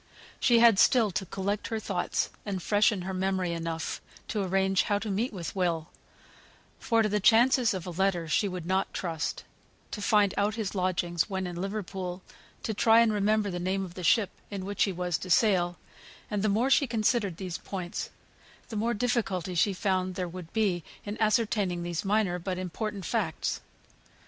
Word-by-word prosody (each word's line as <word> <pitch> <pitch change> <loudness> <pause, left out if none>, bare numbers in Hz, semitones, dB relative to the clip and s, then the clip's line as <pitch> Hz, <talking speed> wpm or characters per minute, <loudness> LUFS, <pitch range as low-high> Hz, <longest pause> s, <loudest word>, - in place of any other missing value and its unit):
She 240 -2 +4
had 230 -4 +6
still 225 -2 +5
to 190 +1 -3
collect 200 +3 -2
her 225 - -2
thoughts 190 -4 -1
and 200 -3 -3
freshen 205 -2 +2
her 190 +1 -4
memory 185 -1 0
enough 165 -1 -3 0.3
to 210 - -1
arrange 190 0 +2
how 205 - +1
to 210 0 -4
meet 220 +6 0
with 180 -5 -6
Will 170 -4 0 0.9
for 230 -2 +2
to - - +2
the 210 +1 +1
chances 235 +3 +5
of 185 - -5
a 180 - -5
letter 175 -1 0
she 180 +7 +2
would 180 -3 -5
not 190 +2 0
trust; 165 -3 -3 0.5
to 210 - -5
find 205 -2 +3
out 205 +1 +1
his 220 -4 -3
lodgings 180 -1 0
when 190 -1 -2
in 175 -1 -5
Liverpool; 190 -1 -4 0.4
to 220 - -1
try 225 +2 +5
and 225 -2 +3
remember 210 0 +1
the 175 - -3
name 190 +2 -1
of 175 - -10
the 180 - -7
ship 200 +2 +3 0.2
in 195 -2 -5
which 205 +1 +1
he 200 - -2
was 180 -2 -2
to 185 - -7
sail: 175 -3 +3 0.5
and 205 -1 0
the 215 - +2
more 235 +7 +2
she 280 - +4
considered 215 -5 +1
these 185 -3 -5
points 180 -3 -5 0.6
the 225 - -6
more 230 +3 0
difficulty 205 -6 -1
she 180 +4 +3
found 185 -1 -1
there 180 0 -2
would 175 -1 -9
be 195 -6 +1 0.2
in 205 0 -4
ascertaining 210 -5 +1
these 175 -1 -3
minor 195 -3 +1
but 180 +1 -3
important 195 +2 -4
facts. 200 -9 -1
195 Hz, 185 wpm, -28 LUFS, 180-215 Hz, 0.9 s, had